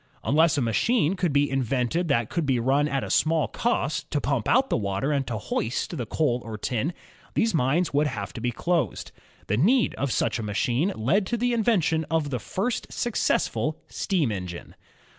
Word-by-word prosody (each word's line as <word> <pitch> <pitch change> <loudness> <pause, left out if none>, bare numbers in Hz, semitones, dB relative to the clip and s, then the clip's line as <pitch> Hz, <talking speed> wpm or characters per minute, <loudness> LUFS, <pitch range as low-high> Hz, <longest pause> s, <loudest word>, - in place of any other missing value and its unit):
Unless 160 +2 +3
a - - +2
machine 185 - +2
should 180 -4 0
be 145 +1 +3
in 135 -1 0
vented 130 +7 0
which 115 -5 +1
could 170 - -1
be 130 -2 +2
run 135 +5 +2
at 135 -3 -1
a - - -4
small 160 -1 +2
cost, 195 - -1
to 145 - 0
pump 135 -6 -1
out 265 +2 +3
the - - +3
water 100 +6 -1
and 140 -2 0
to 115 - -2
hoist 115 - -2
the 120 -7 -4
coal 125 -4 0
or 110 -2 -6
tin, 125 +8 -1 0.4
these 225 -1 +2
mines 155 +4 +1
would 145 +1 +3
have 100 -9 -5
to - - -7
be 125 - 0
dosed. 170 +7 -1 0.3
The 105 - 0
need 230 - +3
of 140 -1 0
such 115 0 0
a - - -3
machine 120 - 0
led 180 - +1
to 240 - -1
the 245 +1 +1
in 230 -2 +1
vention 170 -8 +2
of 160 -3 0
the 125 - -1
first 200 - -3
successful 240 -3 0
steam 170 - 0
engine. 90 -4 -6
145 Hz, 200 wpm, -25 LUFS, 120-175 Hz, 0.4 s, Unless